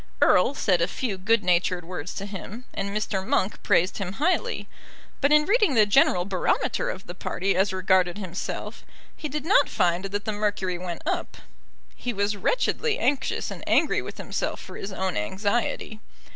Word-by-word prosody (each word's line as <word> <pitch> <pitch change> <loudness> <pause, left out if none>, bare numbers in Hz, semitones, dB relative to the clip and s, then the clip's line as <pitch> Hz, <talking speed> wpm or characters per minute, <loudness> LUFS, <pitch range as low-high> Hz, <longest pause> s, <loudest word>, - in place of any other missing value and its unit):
Erle 285 - +4
said 180 -9 +2
a 170 - +3
few 235 -7 -3
good 210 +4 +2
natured 180 0 +1
words 180 -1 -6
to 200 - -4
him, 205 +4 -8
and 195 0 -3
Mr. 200 -2 -2
Monk 190 +1 0
praised 185 -1 +2
him 190 -2 -3
highly. 320 - 0 0.5
But 280 +1 +3
in 300 0 +6
reading 415 - +3
the 215 -2 +6
general 180 -3 +4
barometer 190 -2 0
of 190 - -6
the 175 - -7
party 190 +1 -1
as 195 +2 +2
regarded 185 -1 +2
himself, 185 -3 -5 0.3
he 305 - -5
did 300 +2 -4
not 380 - +4
find 175 +1 +1
that 205 +1 -3
the 215 - 0
mercury 205 -4 -1
went 175 -2 -6
up. 355 +1 -2 0.6
He 245 - -3
was 200 0 0
wretchedly 465 - 0
anxious, 280 - 0
and - - -8
angry - - +3
with - - -8
himself - - -3
for - - -10
his 195 - -6
own 190 -1 -2
anxiety. 205 - -1
200 Hz, 175 wpm, -25 LUFS, 185-230 Hz, 0.6 s, in